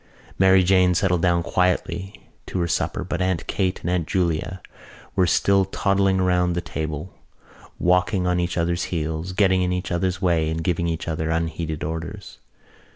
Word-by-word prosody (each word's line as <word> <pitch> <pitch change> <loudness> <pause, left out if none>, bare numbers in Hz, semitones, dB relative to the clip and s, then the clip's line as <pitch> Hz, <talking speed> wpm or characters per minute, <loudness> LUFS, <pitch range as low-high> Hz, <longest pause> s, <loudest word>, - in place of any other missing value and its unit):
Mary 95 0 +6
Jane 90 -1 +4
settled 90 -2 +1
down 85 -1 +2
quietly 90 +2 -1 0.2
to 95 - -3
her 85 - 0
supper - - -1
but - - -3
Aunt 90 -3 0
Kate 95 -2 -1
and 85 - -3
Aunt 90 -3 0
Julia 90 0 -1 0.6
were 95 -2 +3
still 100 +3 +3
toddling 95 0 +1
round 90 -1 +2
the - - 0
table, 80 0 -5 0.6
walking 90 +1 +2
on 90 0 +1
each 85 0 -2
other's 85 +1 0
heels, 80 +1 -3
getting 95 -1 +3
in 90 0 0
each 90 +1 -3
other's 90 +2 0
way 85 -4 +1
and 80 +1 -3
giving 85 -1 0
each 80 -1 -3
other 80 0 -2
unheeded 80 -1 -2
orders. 80 +2 -6
90 Hz, 165 wpm, -23 LUFS, 85-95 Hz, 0.6 s, Mary